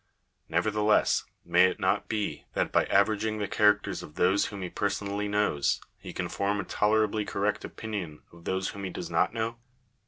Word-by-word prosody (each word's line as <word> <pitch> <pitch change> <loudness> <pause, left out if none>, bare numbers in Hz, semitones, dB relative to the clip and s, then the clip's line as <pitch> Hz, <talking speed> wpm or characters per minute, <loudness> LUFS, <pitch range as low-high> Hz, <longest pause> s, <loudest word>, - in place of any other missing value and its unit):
Nevertheless, 105 0 +2 0.2
may 90 +1 +5
it 95 - 0
not 100 +2 +1
be 105 -1 -2
that - - 0
by - - +3
averaging 110 +2 +2
the 105 -1 -2
characters 105 -1 +2
of 75 - -11
those 95 +3 +3
whom 100 -2 -6
he 90 - -4
personally 100 0 -1
knows, 105 -9 +1 0.2
he - - -8
can - - -3
form 100 +1 -1
a - - -1
tolerably 110 0 +1
correct 100 0 -1
opinion 100 -9 -6
of 85 0 -16
those 95 +1 -1
whom 100 - -7
he 95 - -2
does - - -6
not - - +2
know 115 0 -2
100 Hz, 180 wpm, -28 LUFS, 95-105 Hz, 0.2 s, may